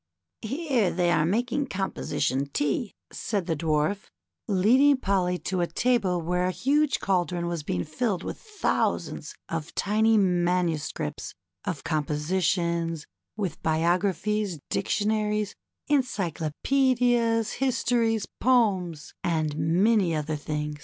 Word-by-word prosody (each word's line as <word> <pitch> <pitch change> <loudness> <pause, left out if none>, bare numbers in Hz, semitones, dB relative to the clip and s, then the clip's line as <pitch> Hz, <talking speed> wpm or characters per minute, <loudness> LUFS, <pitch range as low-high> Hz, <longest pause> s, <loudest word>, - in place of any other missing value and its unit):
" - - -59
Here 260 - 0
they 175 0 +1
are 160 -2 +3
making 245 +8 0
Composition 145 - -1
Tea," 145 - -1 0.2
said 200 -5 -2
the 165 -2 0
Dwarf, 155 +5 0 0.4
leading 245 +8 +4
Polly 190 -6 +1
to 185 0 -2
a 175 - +1
table 200 -1 +1
where 180 +2 0
a - - +1
huge 280 - +1
caldron 180 -2 0
was 170 -2 -2
being 90 -11 -2
filled 200 +3 -2
with - - -5
thousands 430 -2 -1
of 165 -1 -5
tiny 220 +2 +3
manuscripts 175 -4 0 0.3
of - - -3
composi 150 +4 -1
tions, 170 -2 0 0.3
with 185 -7 -3
biographies, 185 +4 +1
dictionaries, 210 -1 0 0.3
encyclopaedias, 240 - +1
histories, 230 -4 +1
poems, 195 - +1
and 155 -3 0
many 175 +4 +2
other 155 0 -2
things. 150 0 -4
185 Hz, 115 wpm, -26 LUFS, 165-225 Hz, 0.4 s, leading